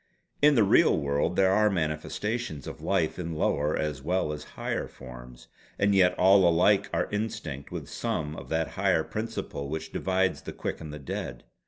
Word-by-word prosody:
In 145 0 +6
the 115 - +5
real 100 - +5
world 70 0 0
there 95 -1 +4
are 105 +2 +4
manifestations 80 - -2
of - - -8
life 90 -5 0
in 85 -2 -4
lower 75 -1 +1
as 75 -3 -2
well 85 0 0
as 75 0 -7
higher - - -2
forms; 60 -1 -12 0.3
and 100 0 +3
yet 90 -2 +4
all 95 -1 +6
alike 100 +4 +3
are - - 0
instinct 105 -10 -4
with - - -6
some 75 0 -3
of - - -9
that 80 0 0
higher 80 - +1
principle 110 -11 -5
which 80 +1 -5
divides 95 0 0
the - - -7
quick - - -4
and 80 -2 -7
the 75 - -6
dead. 70 - -5
85 Hz, 180 wpm, -28 LUFS, 75-100 Hz, 0.3 s, In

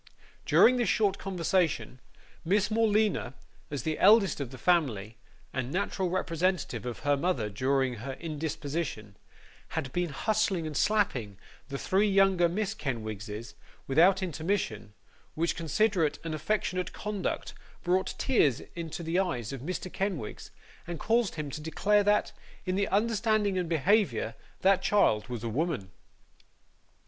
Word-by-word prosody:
During 250 +2 +6
this 240 -6 +1
short 205 -3 +2
conversation, 175 -7 0 0.4
Miss 200 +5 +1
Morleena, 215 - +2 0.3
as 145 -5 -4
the 155 -1 -2
eldest 210 -5 +5
of 140 -4 -3
the 130 - -10
family, 120 - +1 0.4
and 130 0 -3
natural 190 0 -1
representative 170 - -1
of 120 - -5
her 145 0 +2
mother 140 - -1
during 130 +3 0
her 135 +5 -5
indisposition, 150 -7 -4 0.6
had 130 - -3
been 175 -1 0
hustling 200 +2 0
and 155 -1 -5
slapping 135 - +1 0.3
the 140 - -3
three 195 +8 +2
younger 195 -3 +4
Miss 205 +3 -1
Kenwigses, 110 - -5 0.3
without 180 +7 +4
intermission; 155 - -2 0.4
which 170 +2 0
considerate 170 0 +1
and 165 -1 -4
affectionate 180 +2 -1
conduct 210 -3 -3 0.3
brought 185 +2 +1
tears 150 - +2
into 170 0 -5
the 165 +3 0
eyes 140 - -2
of 135 - -6
Mr. 185 +4 -5
Kenwigs, 185 - -3 0.4
and 170 -2 -5
caused 230 -3 +1
him 150 -3 -4
to 155 - -6
declare 205 +6 +2
that, 205 +1 +2 0.3
in 185 +2 0
understanding 215 -1 +1
and 180 -3 -1
behaviour, 165 - +2 0.3
that 190 0 +4
child 110 - +2
was 120 -3 -5
a - - -2
woman. 125 - -2
170 Hz, 135 wpm, -29 LUFS, 135-195 Hz, 0.6 s, During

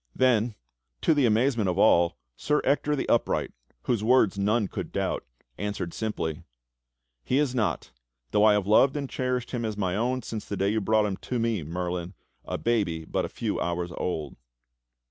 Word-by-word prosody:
^" - - -56
Then, 120 -3 +2 0.5
to - - +4
the 145 -5 +3
amazement 115 -2 +2
of 90 - -1
all, 85 0 +4 0.2
Sir 150 0 +1
Ector 150 +2 +1
the 140 - -3
Upright 120 - +1 0.3
whose 115 -4 0
word 115 -4 +4
none 105 +2 +1
could - - -6
doubt, - - -1 0.4
answered 100 -4 -3
simply: 90 -7 -3 0.8
"He 130 - +1
is 145 -3 +1
not, 110 - -1 0.4
though 105 - +3
I 110 -1 +7
have 105 -2 +1
loved 130 +7 +4
and 140 -1 -3
cherished 125 -2 -2
him 120 -2 -2
as 110 -2 -3
my 95 -3 0
own 125 +3 0
since 110 -2 -5
the 100 - -4
day 100 +1 +1
you 110 +1 0
brought 110 +1 +3
him 100 -2 -2
to 125 - -4
me. 115 -4 0
Merlin, 90 +3 -4 0.3
a - - -4
baby 100 -9 0
but - - -1
a - - -6
few - - -3
hours 85 0 -2
old." 75 -6 -3
110 Hz, 185 wpm, -27 LUFS, 90-125 Hz, 0.8 s, I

